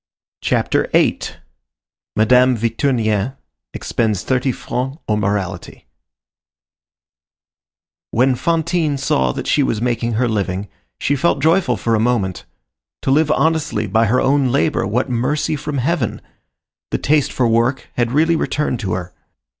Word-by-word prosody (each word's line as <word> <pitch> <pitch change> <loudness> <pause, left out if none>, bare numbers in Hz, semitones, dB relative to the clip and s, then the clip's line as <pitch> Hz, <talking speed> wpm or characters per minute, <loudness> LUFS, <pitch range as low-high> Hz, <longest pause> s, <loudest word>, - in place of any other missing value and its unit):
CHAPTER - - +1
VIII—MADAME 125 +4 0
VICTURNIEN 115 -1 0 0.4
EXPENDS 110 -5 -1
THIRTY 130 0 +1
FRANCS 130 +3 -4
ON 105 -1 +1
MORALITY 100 -3 -3 2.2
When 130 +3 +2
Fantine 165 +1 0
saw 65 - +1
that - - -5
she 150 - +2
was 115 -5 0
making 120 0 -1
her 120 +3 +1
living, 100 -3 -2 0.3
she 145 - +1
felt 140 0 +1
joyful 165 +6 +2
for 115 - -1
a 110 - +3
moment. 110 -6 0 0.6
To - - +1
live 155 +2 +3
honestly 160 -4 +1
by 110 +3 +2
her 125 +5 +2
own 135 0 +2
labor, 140 -3 +1
what 120 +5 0
mercy 135 +6 0
from 150 0 -4
heaven! 135 -2 -1 0.7
The - - 0
taste 150 -1 +1
for 125 - +1
work 115 +4 +1
had 120 -1 0
really 160 +5 +3
returned 150 -5 -1
to 95 -5 -2
her. 90 -1 -5
125 Hz, 130 wpm, -19 LUFS, 110-145 Hz, 2.2 s, a